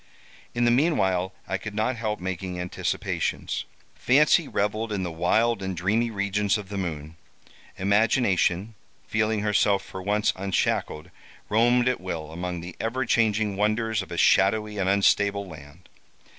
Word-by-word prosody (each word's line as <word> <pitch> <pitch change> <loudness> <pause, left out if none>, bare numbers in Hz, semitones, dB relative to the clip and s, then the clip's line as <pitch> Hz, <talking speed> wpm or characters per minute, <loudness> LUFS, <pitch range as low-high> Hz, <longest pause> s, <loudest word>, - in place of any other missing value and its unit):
In 120 0 +2
the 120 - +4
meanwhile 95 - +2 0.2
I 95 - -2
could 110 -1 -7
not 110 +4 0
help 110 -2 -3
making 90 0 -4
anticipations. 90 0 -2 0.3
Fancy 150 +4 +3
revelled 105 +2 -1
in 100 -3 -2
the 90 - -3
wild 110 +8 +1
and 95 -2 -4
dreamy 110 +7 +1
regions 100 0 0
of 100 -2 -8
the 100 - -5
moon. 80 -3 -5 0.6
Imagination, 100 -1 +2 0.3
feeling 110 -1 0
herself 105 -1 +2
for 95 - -8
once 105 +3 +1
unshackled, 95 -5 -1 0.4
roamed 120 +3 +3
at 125 -5 0
will 80 -4 -5
among 90 +1 -4
the 90 +1 -9
ever 125 +3 -1
changing 110 -3 +1
wonders 110 +1 0
of 95 - -10
a 85 - -4
shadowy 105 +4 +3
and 95 -1 +1
unstable 100 0 +2
land. 75 +1 -13
100 Hz, 145 wpm, -25 LUFS, 95-110 Hz, 0.6 s, the